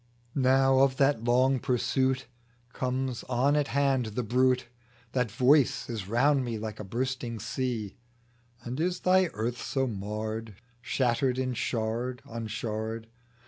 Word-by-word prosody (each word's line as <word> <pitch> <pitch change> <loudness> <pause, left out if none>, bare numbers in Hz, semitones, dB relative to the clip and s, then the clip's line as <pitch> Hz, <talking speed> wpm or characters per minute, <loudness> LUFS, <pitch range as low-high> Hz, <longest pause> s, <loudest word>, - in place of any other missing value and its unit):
Now 135 0 +4
of 135 -1 +3
that 135 -4 +3
long 130 +2 +3
pursuit 130 +2 0 0.5
Comes 130 -1 -2
on 130 +4 +2
at 145 -1 +2
hand 135 -4 +1
the 125 - 0
bruit; 125 +2 +2 0.4
That 125 -3 0
Voice 135 +2 +3
is 105 -5 -4
round 135 +5 +3
me 120 -2 -3
like 110 0 -6
a - - -4
bursting 120 +2 -3
sea: 115 -2 -3 0.7
And 125 +4 -5
is 180 +2 0
thy 185 0 +4
earth 120 +3 -3
so 135 -1 0
marred, 110 0 -4 0.3
Shattered 125 +1 +1
in 130 -1 -1
shard 120 +2 -2
on 115 -1 -5
shard 110 0 -4
125 Hz, 140 wpm, -29 LUFS, 115-130 Hz, 0.7 s, Now